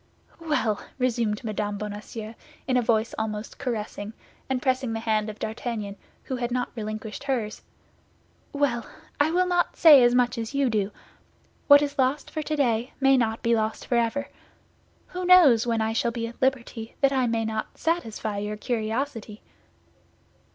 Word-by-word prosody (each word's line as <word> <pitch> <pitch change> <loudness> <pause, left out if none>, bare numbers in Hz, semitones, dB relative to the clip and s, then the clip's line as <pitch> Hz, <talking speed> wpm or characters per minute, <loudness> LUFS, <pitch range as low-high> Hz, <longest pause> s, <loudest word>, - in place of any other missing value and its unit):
"Well!" 300 -10 0 0.2
resumed 235 -4 0
Mme. 210 -2 -2
Bonacieux, 210 +1 -6 0.3
in 260 - +1
a 250 - +4
voice 225 -1 +1
almost 215 0 -4
caressing, 215 -3 -4 0.4
and 265 -1 0
pressing 255 -2 0
the 225 - -2
hand 220 -1 0
of 215 - -8
D'Artagnan, 220 -2 -4 0.3
who 260 - -4
had 240 -1 -2
not 250 0 -2
relinquished 215 +2 -6
hers, 235 -6 -2 0.9
"well: 275 -5 0 0.4
I 290 +2 +4
will 360 +3 +2
not 355 -1 +1
say 300 -5 +9
as 240 0 +4
much 245 -1 +2
as 225 +4 -5
you 275 -3 +2
do; 205 -2 0 0.8
what 285 0 +8
is 285 0 -4
lost 260 +3 +1
for 310 - -3
today 260 -6 0
may 270 0 +5
not 225 -3 0
be 235 0 +3
lost 220 0 -2
forever. 235 +3 0 0.8
Who 365 0 -5
knows, 315 -11 +6
when 230 -1 +1
I 220 0 0
shall 235 +1 +1
be 230 0 -3
at 230 +1 -9
liberty, 245 -3 -1
that 275 -1 +4
I 260 -2 +2
may 230 -1 0
not 220 0 -4
satisfy 225 -11 -2
your 210 +1 -4
curiosity?" 225 0 -3
235 Hz, 160 wpm, -26 LUFS, 220-265 Hz, 0.9 s, say